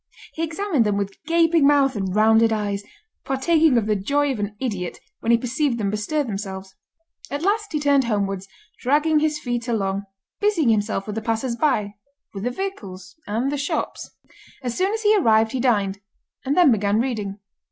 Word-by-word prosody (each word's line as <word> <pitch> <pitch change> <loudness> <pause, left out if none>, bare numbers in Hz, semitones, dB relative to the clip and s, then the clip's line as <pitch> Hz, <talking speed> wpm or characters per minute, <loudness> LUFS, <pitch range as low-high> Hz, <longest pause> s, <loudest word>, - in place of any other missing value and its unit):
He 320 - -5
examined 330 - 0
them 205 -2 0
with 200 -1 -4
gaping 330 -3 +4
mouth 280 -3 +3
and 190 -2 -2
rounded 220 +1 +5
eyes, 205 -2 -2 0.4
partaking 305 +1 +3
of 225 - +1
the 215 0 +1
joy 280 +9 +1
of 250 - -4
an 205 0 -3
idiot 200 -9 -3 0.2
when 230 - 0
he 235 - +6
perceived 255 +2 -1
them 200 -3 -1
bestir 220 +9 -1
themselves. 195 -4 -6 0.6
At 285 +3 -4
last 425 +2 0
he 305 - -1
turned 285 -2 +3
homewards, 195 -3 -1 0.3
dragging 300 +4 +2
his 305 0 0
feet 240 -4 -3
along, 200 -4 -1 0.3
busying 390 - +2
himself 205 -2 0
with 210 - -5
the 220 - -3
passers 230 +2 -1
by, 230 -7 0 0.4
with 195 +1 -5
the - - +1
vehicles, 200 - -6
and 235 +6 -1
the 290 - -2
shops. 290 - -3 0.5
As 245 -2 -3
soon 380 +2 +1
as 445 +1 -3
he 425 0 +5
arrived 220 - +3
he 260 - -2
dined, 205 -6 +1 0.4
and 275 +4 -1
then 350 -7 +6
began 205 -1 +2
reading. 215 -6 -2
235 Hz, 185 wpm, -22 LUFS, 205-290 Hz, 0.6 s, he